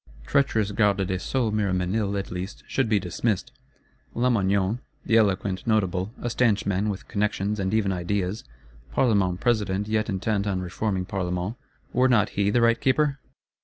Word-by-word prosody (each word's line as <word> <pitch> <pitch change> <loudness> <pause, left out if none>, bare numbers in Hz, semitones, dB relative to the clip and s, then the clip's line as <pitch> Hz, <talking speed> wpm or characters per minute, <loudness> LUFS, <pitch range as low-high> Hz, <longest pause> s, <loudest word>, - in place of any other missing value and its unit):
Treacherous 110 - +1
Garde 100 -2 +2
des 95 0 -2
Sceaux 120 +1 -1
Miroménil, 100 0 0
at 100 - -4
least, 90 +3 -6
should 135 -4 0
be 105 -2 +3
dismissed; 95 +3 -2 0.6
Lamoignon, 100 -3 +1 0.3
the 115 - +2
eloquent 100 -3 +1
Notable, 95 -3 +1
a - - -3
stanch 115 -4 +2
man, 100 +2 0
with 100 -1 -5
connections, 105 0 -1
and 95 -1 -1
even 105 -3 +1
ideas, 95 +2 -2 0.5
Parlement 100 -8 +2
President 105 -4 +1
yet 110 0 0
intent 100 +1 -1
on 95 -2 0
reforming 90 +1 -2
Parlements, 90 +2 -2 0.4
were 130 +1 +4
not 115 -5 +3
he 100 0 0
the 120 +3 +2
right 115 0 +3
Keeper? 140 +1 +2
100 Hz, 155 wpm, -25 LUFS, 95-110 Hz, 0.6 s, were